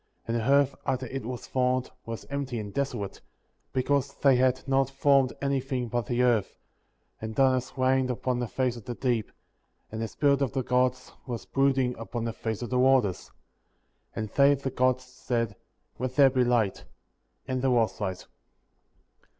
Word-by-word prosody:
*4. - - -18
And - - +1
the 115 - -1
earth, 140 -1 +4
after 130 -1 -1
it 130 -1 -5
was 125 0 -5
formed, 130 0 0 0.2
was 115 -1 -6
empty 140 -3 -3
and 105 -2 -6
desolate, 120 -8 -3 0.5
because 140 +1 0
they 135 -2 +4
had 130 +1 +1
not 135 -1 +2
formed 135 -1 +3
anything 135 -3 -1
but 120 0 -2
the 125 0 +1
earth; 120 -5 +1 0.6
and 110 0 -5
darkness 130 0 +2
reigned 130 0 +2
upon 125 0 -1
the 120 - -2
face 130 +1 -1
of 115 - -11
the 120 - -4
deep, 120 -4 -1 0.6
and 110 +1 -4
the 115 - -1
Spirit 140 +5 +2
of 135 -2 0
the 130 -1 -1
Gods 125 +1 0 0.2
was 120 -2 -5
brooding 135 -2 +1
upon 115 0 -4
the 115 - -2
face 110 +1 -4
of 120 - -6
the 125 - +2
waters. 125 -8 +3 0.9
3. - - -2
And 110 - -5
they 140 +5 +5
(the 135 -1 -4
Gods) 130 0 +1
said: 120 -4 -3 0.4
Let 130 0 -3
there 140 -2 +6
be 130 -1 +2
light; 120 -5 +1 0.6
and 130 -1 -1
there 135 - +2
was 115 -5 +1
light. 95 -3 -3
125 Hz, 180 wpm, -28 LUFS, 120-135 Hz, 0.9 s, there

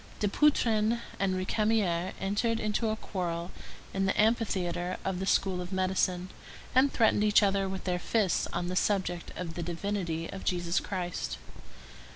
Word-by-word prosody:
Dupuytren 225 -1 +3 0.2
and 195 -1 +1
Récamier 185 -2 +1
entered 220 +4 0
into 215 +1 0
a 215 - 0
quarrel 175 -5 -4 0.4
in 195 0 +1
the - - 0
amphitheatre 190 -5 +1
of 190 -2 -1
the 190 - -3
School 190 -2 +2
of 180 +1 -7
Medicine, 185 -1 0 0.4
and 265 +2 +5
threatened 220 -2 +3
each 210 0 +5
other 195 -1 +2
with 190 0 -5
their 180 -1 -1
fists 205 -1 +1
on 175 +1 -2
the 180 - -3
subject 185 -3 0
of 170 -2 -4
the 170 - -4
divinity 170 -1 -2
of 190 - -7
Jesus 175 0 0
Christ. 180 - -3
190 Hz, 155 wpm, -30 LUFS, 180-210 Hz, 0.4 s, and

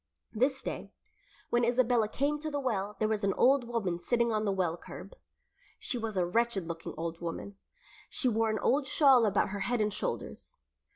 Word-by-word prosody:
This 260 +4 +1
day, - - -5 0.6
when 240 0 +3
Isabella 240 -2 +3
came 285 +6 -1
to 310 +1 -4
the 290 -1 -2
well 210 -6 -2
there 215 - +1
was 215 -1 -1
an 195 -1 +1
old 265 -1 +4
woman 200 -8 -2
sitting 235 +6 +1
on 215 0 0
the 200 - +1
well 180 -4 0
curb. 175 - -10 0.6
She - - -3
was 225 -4 -3
a 180 - +2
wretched 205 -1 0
looking 165 -1 -6
old 165 +1 -4
woman. 190 +4 -6 0.5
She 260 - 0
wore 225 -1 +2
an 215 - 0
old 270 +4 +1
shawl 270 -6 +5
about 205 -1 +1
her 200 +1 -4
head 235 +5 0
and 210 -1 +1
shoulders. - - -5
220 Hz, 190 wpm, -30 LUFS, 195-250 Hz, 0.6 s, shawl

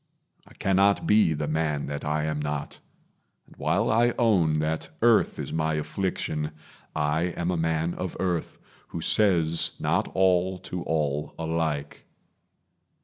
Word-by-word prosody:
I - - -18
cannot 95 +1 +2
be 105 -7 +4
the 75 0 -3
man 75 -1 -1
that 70 0 -5
I 75 +1 0
am 75 -1 -2
not; 75 0 -4 0.7
And - - -19
while - - +1
I 120 +2 +3
own 90 -10 +3
that 80 +1 -2
earth 115 -2 +4
is - - -5
my 80 0 0
affliction, 75 -2 -2 0.4
I 75 +2 +1
am 85 +1 0
a - - 0
man 80 0 0
of 90 -2 -5
earth, 90 -3 -2 0.3
who 85 - -6
says 85 -5 +2
not - - +1
all 95 0 +3
To 90 -1 -6
all 75 -2 -1
alike. 80 -3 -2
80 Hz, 145 wpm, -26 LUFS, 75-90 Hz, 0.7 s, be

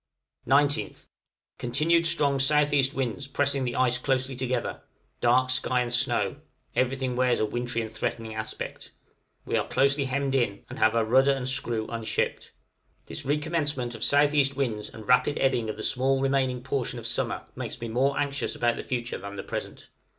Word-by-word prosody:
19th. 145 +2 +1 0.5
Continued 160 +7 +2
strong 145 -5 +2
S.E. 145 0 +4
winds, 135 +1 -2
pressing 140 -1 0
the 120 - -2
ice 125 -1 +2
closely 130 0 0
together, 130 0 -2 0.4
dark 130 +2 +3
sky 125 0 +2
and 120 -1 -3
snow; 120 - +1 0.4
everything 130 0 0
wears 125 -1 +2
a - - +2
wintry 120 +1 -2
and 110 - -7
threatening 110 0 -3
aspect; 110 0 -5 0.6
we - - -1
are - - 0
closely 140 +1 +2
hemmed 135 +1 -1
in, 120 -7 0
and - - -7
have 110 +1 +4
our 115 -1 +2
rudder 130 +5 +4
and 130 -2 -3
screw 120 -4 -1
unshipped. 115 -1 -2 0.5
This 145 - -7
recommencement 145 -4 -1
of - - -9
S.E. 145 -1 +4
winds 115 -6 -2
and 110 -2 -11
rapid 125 +3 +3
ebbing 125 -4 +1
of 105 - -4
the 110 - -6
small 135 +1 +1
remaining 135 -2 0
portion 135 -2 -2
of - - -7
summer - - 0
makes - - -5
me 115 - -4
more 130 +5 +1
anxious 145 -1 -2
about 120 -1 +1
the - - -5
future 120 -2 -3
than 100 +1 -8
the 95 - -5
present. - - -6
130 Hz, 170 wpm, -27 LUFS, 120-140 Hz, 0.6 s, S.E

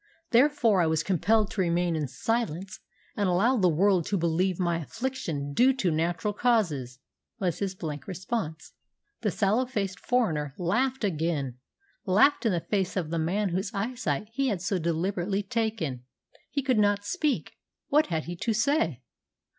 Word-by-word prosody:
Therefore 240 -6 +4
I 165 - +3
was 160 0 +1
compelled 200 +4 +2
to 200 - -1
remain 175 -1 +1
in 150 -2 -1
silence, 190 - -2 0.4
and 200 -3 +1
allow 205 +9 +3
the 185 -4 +4
world 180 +2 +3
to 200 - 0
believe 170 +2 +1
my 170 -2 +1
affliction 165 - -4
due 255 - +5
to 195 -9 0
natural 170 +6 0
causes," 170 - +1 0.4
was 180 -5 -1
his 195 -2 -2
blank 155 -5 -6
response. 185 -3 -4 0.5
The 215 - +1
sallow 215 +7 +1
faced 195 -7 -3
foreigner 155 - 0
laughed 245 +9 0
again, 155 - -1 0.5
laughed 220 +7 +4
in - - +2
the 175 -2 0
face 190 +2 -1
of 165 -4 -2
the 165 - 0
man 190 +6 0
whose 190 +3 -1
eyesight 205 - -2
he 275 +2 0
had 205 -7 0
so 195 -1 0
deliberately 180 +4 -1
taken. 200 - -2 0.5
He 280 -1 -2
could 255 -4 +2
not 205 -1 +2
speak. 300 - -1 0.3
What 300 +2 +4
had 160 -3 -1
he 175 - -6
to 225 +5 0
say? 215 - +1
190 Hz, 160 wpm, -27 LUFS, 165-225 Hz, 0.5 s, due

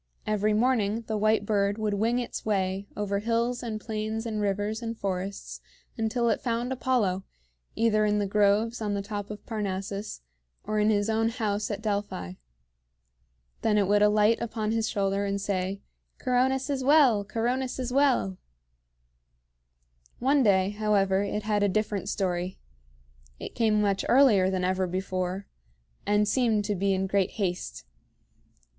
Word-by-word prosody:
Every 215 0 +1
morning 225 -1 +1
the 220 - -3
white 215 0 +2
bird 200 -1 +1
would 215 -2 -1
wing 225 +4 +1
its 245 -1 -4
way 195 -1 -1
over 200 -1 -1
hills 235 +3 0
and 225 -3 -4
plains 220 +1 -4
and 215 -2 -2
rivers 205 +2 -1
and 230 -1 -4
forests 195 0 -4 0.3
until 235 +1 0
it - - 0
found 240 +1 -1
Apollo, 225 -8 0 0.5
either 220 -2 +2
in 210 0 +2
the 205 - +1
groves 210 +3 +2
on 205 -2 -1
the 200 - -2
top 205 0 -5
of 210 0 -8
Parnassus 200 - -4 0.4
or 215 0 -1
in 210 +1 +3
his 205 -1 +2
own 225 0 +1
house 210 -3 -2
at 205 0 -4
Delphi. 200 - -3 1.3
Then 215 -1 +2
it 200 -2 +2
would 205 +1 +3
alight 210 +2 +4
upon 220 -2 -2
his 225 -1 0
shoulder 200 -1 0
and 200 0 -1
say, 195 -1 -2 0.3
"Coronis 260 +2 +1
is 265 -2 -1
well! 265 -7 +5
Coronis 240 +5 -2
is 255 -1 -3
well!" 260 -9 +2 1.8
One 275 +3 +3
day, 195 -4 +3
however, 205 -2 +1
it 205 +1 -2
had 210 -1 0
a 205 - +3
different 205 -1 -1
story. 180 -2 -2 0.8
It - - -7
came 220 -2 +2
much 200 -2 +1
earlier 230 -8 +5
than 185 -1 -1
ever 185 0 0
before, 185 +1 -3 0.6
and 210 0 +3
seemed 220 -3 +2
to 210 - 0
be 195 +1 0
in 190 0 -1
great 195 0 0
haste. 175 - -3
210 Hz, 155 wpm, -27 LUFS, 200-225 Hz, 1.8 s, well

